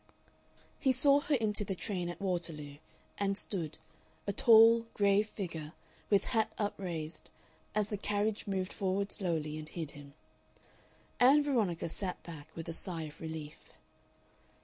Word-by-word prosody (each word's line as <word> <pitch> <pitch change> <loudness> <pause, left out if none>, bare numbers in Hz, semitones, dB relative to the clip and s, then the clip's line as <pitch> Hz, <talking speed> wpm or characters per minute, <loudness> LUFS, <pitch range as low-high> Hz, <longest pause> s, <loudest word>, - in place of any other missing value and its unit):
He 265 - +3
saw 275 +2 +5
her 290 0 +1
into 215 -4 0
the 195 -1 -3
train 180 -3 -3
at 175 - -6
Waterloo, 165 -7 -3 0.4
and 200 -1 +1
stood, 175 -7 -4 0.5
a 200 - -1
tall, 230 +1 +7
grave 205 +1 +3
figure, 160 -7 -5 0.4
with 200 -2 +4
hat 220 -2 +2
upraised, 170 -6 -4 0.5
as 210 -1 +1
the 210 - -2
carriage 210 +1 -1
moved 190 -1 -2
forward 195 0 -1
slowly 160 -6 -2
and 155 0 -8
hid 160 -4 -5
him. 145 0 -13 1.0
Ann 275 +4 +7
Veronica 220 - 0
sat 180 +2 -4
back 155 -3 -9
with 165 - -6
a 165 - -3
sigh 170 -1 -4
of 150 -1 -10
relief. 160 -2 -7
195 Hz, 145 wpm, -33 LUFS, 160-210 Hz, 1.0 s, tall